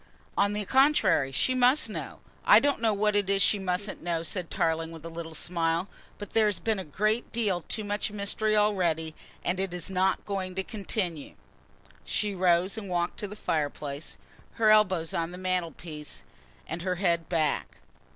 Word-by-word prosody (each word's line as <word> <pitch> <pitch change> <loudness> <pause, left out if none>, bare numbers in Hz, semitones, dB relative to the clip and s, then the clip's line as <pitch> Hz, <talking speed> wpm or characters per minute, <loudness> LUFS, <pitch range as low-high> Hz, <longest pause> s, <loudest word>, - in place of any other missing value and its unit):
"On 200 +1 +2
the 210 0 -2
contrary, 245 - +3
she 255 - +1
must 255 +2 +4
know. 215 - -7 0.2
I - - +8
don't 285 -4 0
know 225 -2 +3
what 210 0 +1
it 200 -2 +1
is 200 0 +2
she 205 - +4
mustn't 190 +2 -2
know," 165 -1 -1
said 175 0 -3
Tarling 165 0 0
with 165 -1 -10
a - - -4
little 165 -1 -6
smile, 165 +2 0 0.3
"but 205 - -8
there 220 -1 +4
has 205 - 0
been 220 -3 0
a - - -4
great 215 +9 -1
deal 205 -6 0
too 215 - -2
much 205 +1 -2
mystery 210 +1 0
already, 175 -7 +1 0.3
and 180 +1 0
it 190 -2 -2
is 180 +1 -5
not 190 +1 +1
going 190 -2 -3
to 190 - -1
continue." 190 -7 -3 0.7
She 210 -1 -1
rose 185 +2 +2
and 200 -3 -8
walked 175 -1 -1
to 205 - -3
the 205 - -8
fireplace, 145 -4 -3 0.4
her 220 -1 +4
elbows 185 -7 +3
on 165 0 -1
the 180 - -9
mantelpiece, 170 -4 -4 0.4
and 175 - -5
her 180 0 -1
head 170 -3 0
back. 160 -3 0
185 Hz, 180 wpm, -28 LUFS, 170-210 Hz, 0.7 s, I